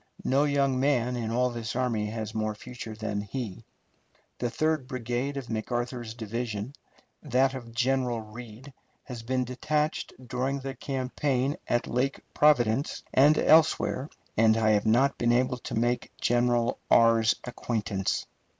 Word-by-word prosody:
No 140 +3 +3
young 140 -3 +1
man 125 -3 +1
in 115 -2 -3
all 125 +2 +1
this 115 -1 -5
army 120 -4 0
has 110 0 -5
more 110 -1 -1
future 120 -1 -8
than 105 -2 -3
he. 110 0 -5 0.8
The 120 - 0
third 155 +1 0
brigade 125 +2 -3
of 135 - -4
McArthur's 120 +1 -3
division, 115 +1 -4 0.5
that 135 -1 +2
of 120 -3 -7
General 125 -1 +1
Reid, 115 +4 -10 0.3
has 125 -4 -7
been 130 +2 0
detached 150 +5 -1 0.2
during 130 +3 -1
the 135 0 -4
campaign 135 +1 -1
at 120 - +1
Lake 130 +3 -1
Providence 135 -3 +3
and 145 +3 +6
elsewhere, 155 -3 +3 0.3
and 110 0 +4
I 110 -1 +3
have 105 0 +2
not 130 +5 +3
been 120 0 +3
able 125 +1 +1
to - - -5
make 120 +2 0
General 120 -1 +2
R.'s 115 -1 +5
acquaintance. 110 -5 -2
120 Hz, 140 wpm, -28 LUFS, 115-135 Hz, 0.8 s, and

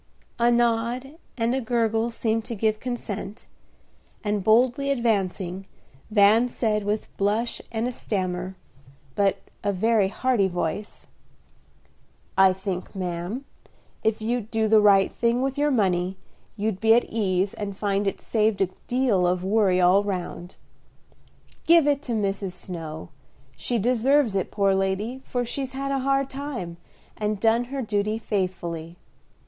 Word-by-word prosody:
A 235 0 +4
nod 240 +5 0 0.2
and 230 +1 +1
a 265 - 0
gurgle 225 -1 +1
seemed 225 -1 -1
to 235 - -5
give 215 +1 0
consent, 220 -3 -5 0.8
and, 210 -2 -1
boldly 245 +6 +3
advancing, 195 -7 -1 0.4
Van 215 +3 +5
said, 215 -4 -1
with 210 +1 -3
blush 215 +4 0
and 225 +1 -1
a - - -2
stammer, 185 -5 -3 0.6
but 200 +3 +2 0.3
a 205 - +1
very 210 +1 +2
hearty 220 0 +1
voice, 180 +3 -4 1.3
"I 190 0 +6
think, 190 0 -5
ma'am, 180 +7 -4 0.6
if 220 0 0
you'd 230 -1 -1
do 220 -1 +1
the 215 0 +6
right 200 -2 +5
thing 240 +2 +1
with 270 0 -1
your 295 +1 +2
money 190 -6 +1 0.4
you'd 210 -2 -1
be 225 +1 +5
at 240 - +4
ease 195 -3 0
and 200 -2 -5
find 200 -1 0
it 195 - -2
saved 220 -2 +1
a 190 - +2 0.2
deal 240 -8 +2
of 180 0 0
worry 195 -2 +3
all 185 +3 +5
round. 180 -2 -5 1.1
Give 335 -2 +6
it 285 -1 +2
to - - +1
Mrs. 195 -3 -1
Snow; 165 -3 -7 0.5
she 240 - -2
deserves 250 +2 +2
it, 195 -2 -1
poor 200 -2 +2
lady, 195 +7 -1
for 245 -1 -2
she's 265 +2 -4
had 275 +1 -3
a 275 - +1
hard 275 +1 +1
time, 265 -12 -6 0.4
and 210 -1 -2
done 230 +3 +3
her 270 +1 -4
duty 210 0 0
faithfully. 175 -6 -3
215 Hz, 145 wpm, -25 LUFS, 190-240 Hz, 1.3 s, I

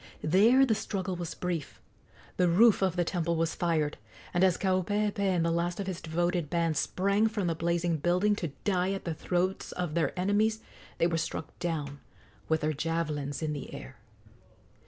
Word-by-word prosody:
There 220 - +5
the 235 - +2
struggle 190 -3 -3
was 175 -2 -5
brief. 175 -5 -4 0.6
The 180 -1 +3
roof 210 +6 +5
of 190 -3 +1
the 175 - +2
temple 170 -1 -1
was 165 0 0
fired, 160 -4 0 0.4
and 175 - +2
as 185 -2 +4
Kaupeepee 205 +3 0
and 185 -4 +2
the 170 - +1
last 170 +2 -1
of 200 - -2
his 185 -3 -4
devoted 175 -1 -1
band 165 -2 +1
sprang 200 +7 +1
from 215 -3 -2
the 170 - +1
blazing 170 +1 0
building 180 +7 +2
to 170 - -2 0.2
die 190 -1 +1
at 195 - -5
the 170 - -1
throats 180 +4 -1
of 175 -4 -3
their 170 +2 0
enemies 210 +4 +2 0.4
they - - +2
were 165 -1 +1
struck 160 - -4
down 150 -5 -3 0.5
with 160 0 +2
their 155 +1 0
javelins 150 -2 -2
in 155 -1 -1
the 145 -3 -6
air. - - -10
175 Hz, 180 wpm, -29 LUFS, 165-190 Hz, 0.6 s, There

